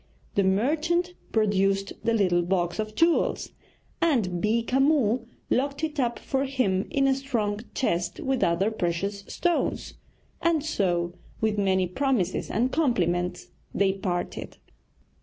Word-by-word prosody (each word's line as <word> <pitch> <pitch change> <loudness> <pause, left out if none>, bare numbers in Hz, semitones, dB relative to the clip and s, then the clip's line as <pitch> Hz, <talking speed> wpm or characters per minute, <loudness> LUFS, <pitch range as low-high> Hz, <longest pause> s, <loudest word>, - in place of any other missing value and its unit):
The 200 - +2
merchant 310 - +1 0.2
produced 195 -2 +1
the 230 - +2
little 180 -5 +3
box 175 +1 -1
of 215 0 -3
jewels, 330 0 +2 0.5
and 220 - +1
Beeka 230 +4 +1
Mull 255 -5 +2 0.2
locked 280 +3 0
it 310 -2 -2
up 240 -2 +1
for 270 0 -1
him 240 -9 0
in 275 -1 +1
a 270 - +4
strong 235 -7 -1 0.2
chest 175 -8 -1
with 265 -1 0
other 175 +5 +2
precious 200 +1 -2
stones; 350 -1 -1 0.5
and 325 -3 +2
so, 175 - 0 0.3
with 215 -1 0
many 190 -2 +2
promises 200 -1 0
and 250 +3 +1
compliments, 180 - 0 0.3
they 195 -1 +3
parted. 180 -2 -4
215 Hz, 130 wpm, -26 LUFS, 190-270 Hz, 0.5 s, a